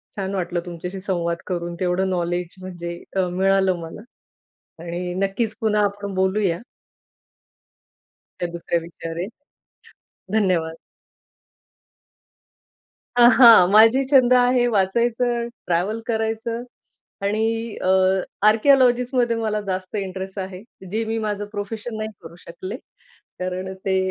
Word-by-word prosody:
छान 195 -1 -3
वाटलं 175 -1 -2
तुमच्याशी 180 +2 -6
संवाद 170 -3 -1
करून. 175 -1 -3
तेवढं 185 +1 0
नॉलेज 175 0 -2
म्हणजे 175 -2 -6 0.2
अ, 185 -1 +2
मिळालं 190 0 +2
मला. 165 +5 -8 0.8
आणि 175 +1 -4
नक्कीच 195 +3 -1
पुन्हा 210 -1 +2
आपण 200 0 -4
बोलूया. 190 -2 +1 1.8
त्या 175 - -1
दुसऱ्या 170 0 -1
विचारे 165 +1 -6 1.1
धन्यवाद. 180 -6 +1 2.5
आहां, 235 -6 +8
माझी 225 +6 +6
छंद 255 -3 +5
आहे, 245 0 +4
वाचायचं, 235 +4 +1 0.2
ट्रॅव्हल 185 +6 0
करायचं 225 +1 -2 0.6
आणि 225 +2 -1
अ, - - -2 0.6
आर्किओलॉजिस्टमध्ये 245 0 +4
मला 215 -2 -1
जास्त 185 +2 -3
इंटरेस्ट 190 0 -5
आहे. 190 0 -6 0.3
जे 225 +2 -1
मी 225 +1 -2
माझं 210 -1 -2
प्रोफेशन 220 +2 -5
नाही 215 0 -3
करू 165 +1 -11
शकले. 185 +7 -7 0.6
कारण 185 +1 -4
ते 190 -1 +1
195 Hz, 105 wpm, -22 LUFS, 180-225 Hz, 2.5 s, आहां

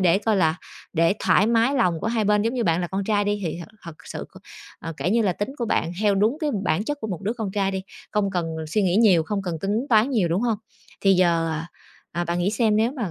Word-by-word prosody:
để 185 +1 +4
coi 215 -1 +1
là 160 -4 +3 0.4
để 165 +2 +3
thoải 205 - +3
mái 235 +4 +3
lòng 180 -11 +1
của - - -3
hai 225 -2 0
bên. 210 0 +3
Giống 230 +3 -1
như 240 - 0
bạn 165 -1 +2
là 175 - -1
con 190 +2 -3
trai 205 -1 +1
đi 205 0 -1
thì 165 +1 -3
thật 170 - -9
thật 170 -3 -9
sự - - -6
c - - -21 0.4
ờ, 165 - -5
kể 150 +7 -1
như 230 +1 +3
là 190 -4 +2
tính 205 +6 -3
của 235 - -1
bạn 170 -5 0
theo 205 -2 +3
đúng 215 +8 +2
cái 305 -2 0
bản 200 +5 +1
chất 290 +2 -3
của 220 - -3
một 190 -2 -5
đứa 215 +4 -1
con 220 -5 -4
trai 195 -1 0
đi, 190 -1 -3 0.3
không 200 -2 0
cần 175 -3 -1 0.2
suy 210 +5 +1
nghĩ 185 0 +2
nhiều, 195 -8 +5
không 195 +4 -3
cần 170 -4 -3
tính 215 +7 -1
toán 225 +3 +4
nhiều, 210 -9 +1
đúng 170 +4 0
hông? 225 -4 0 0.4
Thì 195 -1 +4
giờ, 170 -2 +2
ờ, 160 0 -2 0.6
à, - - 0
bạn 170 +1 -2
nghĩ 180 +3 +1
xem 215 0 +2
nếu 225 +4 +2
mà 230 - -3
200 Hz, 280 wpm, -23 LUFS, 175-220 Hz, 0.6 s, nhiều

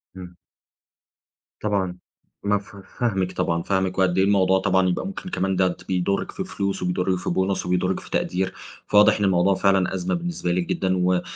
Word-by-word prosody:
إمم. 90 -1 -10 1.2
طبعًا. 95 -4 -1 0.5
مفه 100 -1 -2 0.2
فاهمِك 95 -6 0
طبعًا. 85 -2 -1
فاهمِك، 95 -1 -1
وقد 95 -1 +2
إيه 95 - +4
الموضوع 95 -1 +3
طبعًا 95 -1 +2
يبقى 90 - -2
ممكن 190 -1 -7
كمان 95 - -1
ده 95 -1 +1
بيضُرِّك 95 +1 -1
في 190 - -4
فلوس، 100 - -3
وبيضُرِّك 90 +1 0
في - - -4
بُونص، 95 +1 0
وبيضُرِّك 90 +1 0
في - - -14
تقدير. 95 +1 -1 0.3
فواضح 105 +1 +5
إن 105 - +2
الموضوع 95 0 +3
فعلًا 95 -1 +2
أزمة 90 -1 -2
بالنسبة 170 - -2
لِك 90 0 0
جدًا، 95 -1 0
و 90 0 +2
95 Hz, 170 wpm, -23 LUFS, 90-100 Hz, 1.2 s, فواضح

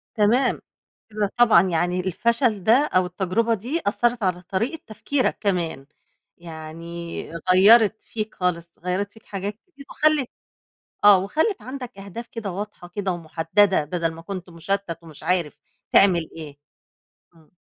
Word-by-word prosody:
تمام. 235 +4 +2 0.5
لأ 210 -1 -1
طبعًا 240 -8 +7
يعني 175 +2 0
الفشل 215 +3 0
ده 245 +9 +4
أو 185 0 +4
التجربة 190 +6 0
دي 245 - -2
أثّرت 240 +1 +1
على 180 -1 0
طريقة 220 - -2
تفكيرك 255 +5 -1
كمان. 175 -8 -1 0.5
يعني 165 +1 -7 0.3
غيّرت 215 +3 +6
فيك 215 -1 -5
خالص، 170 -2 -3
غيّرت 185 +3 -2
فيك 220 - -19
حاجات 200 +1 -5
كتير، 285 -6 -15
وخلّت 305 -4 +2 0.8
آه، 205 -2 +9
وخلّت 315 - 0
عندك 255 -4 -8
أهداف 200 +4 -8
كده 225 -4 -4
واضحة 200 -1 -7
كده 190 +1 -2
ومُحدَّدَة، 170 +2 +1
بدل 165 +1 -2
ما 165 +1 -11
كنت 185 -1 -7
مُشَتَّت 170 +1 -3
ومش 160 -3 -13
عارف 175 -2 0 0.4
تعمل 175 -5 +4
إيه. 150 -3 -8 0.8
امم. 160 -2 -23
195 Hz, 135 wpm, -23 LUFS, 170-225 Hz, 0.8 s, آه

